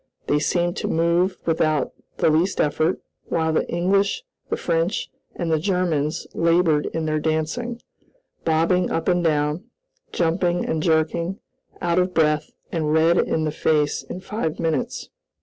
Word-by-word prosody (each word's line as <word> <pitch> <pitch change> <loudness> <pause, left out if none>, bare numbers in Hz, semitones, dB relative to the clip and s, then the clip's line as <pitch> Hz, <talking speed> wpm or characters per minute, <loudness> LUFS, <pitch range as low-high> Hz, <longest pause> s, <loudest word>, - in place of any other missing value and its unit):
They 145 - +2
seemed 175 +3 0
to - - -2
move 170 +3 +2
without 155 -2 +1 0.2
the 160 - +3
least 170 +5 +1
effort, 155 +4 +1 0.3
while 160 -1 0
the - - 0
English, 195 - +1 0.3
the - - -1
French, 170 +3 -1 0.2
and 170 -2 -2
the 160 - +3
Germans 170 -4 0
labored 165 -2 +3
in 160 -1 -3
their 155 0 0
dancing, 160 +11 -2 0.6
bobbing 165 +3 +2
up 165 - -2
and 175 -1 +2
down, 150 +3 +1 0.5
jumping 175 +1 +1
and 160 - -1
jerking, 165 +3 +1 0.5
out 170 +1 +2
of 180 0 0
breath 150 -1 +2 0.2
and 155 -3 -1
red 160 +2 +4
in 160 - +1
the 155 - 0
face 150 -1 +1
in 185 - -8
five 190 -6 -3
minutes. 170 +10 -2
165 Hz, 150 wpm, -23 LUFS, 155-180 Hz, 0.6 s, red